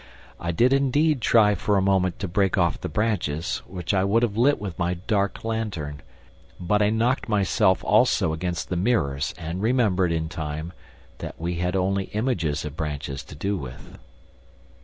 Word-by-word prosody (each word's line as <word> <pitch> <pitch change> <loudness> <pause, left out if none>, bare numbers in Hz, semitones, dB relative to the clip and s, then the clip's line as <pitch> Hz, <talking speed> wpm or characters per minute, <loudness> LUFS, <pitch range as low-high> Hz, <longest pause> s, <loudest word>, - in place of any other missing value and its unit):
I 85 - -2
did 120 +10 +3
indeed 140 +1 +2
try 105 -3 +5
for 105 0 +1
a - - +3
moment 95 -2 +2
to 100 - -1
break 95 +2 +1
off 85 -3 +1
the - - -3
branches, 85 -5 -1
which 90 0 -3
I 95 -1 +2
would 110 +4 +2
have 105 -4 0
lit 135 +6 +3
with 95 -4 -6
my 90 +1 0
dark 100 +2 -1
lantern, 95 - -3 0.6
but 105 +4 +1
I 105 - +4
knocked 115 +3 0
myself 100 -2 +2
also 105 -6 +3
against 85 +1 -3
the 90 - -1
mirrors 75 - 0
and 85 +2 -5
remembered, 105 -7 +2
in 80 -1 -1
time, 80 +1 -5 0.5
that - - -7
we 85 +1 -2
had 90 +1 -1
only 95 +1 +1
images 85 - -1
of 75 -1 -6
branches 75 -3 -4
to - - -11
do 100 +7 -1
with. 65 -8 -9
95 Hz, 175 wpm, -24 LUFS, 80-105 Hz, 0.6 s, try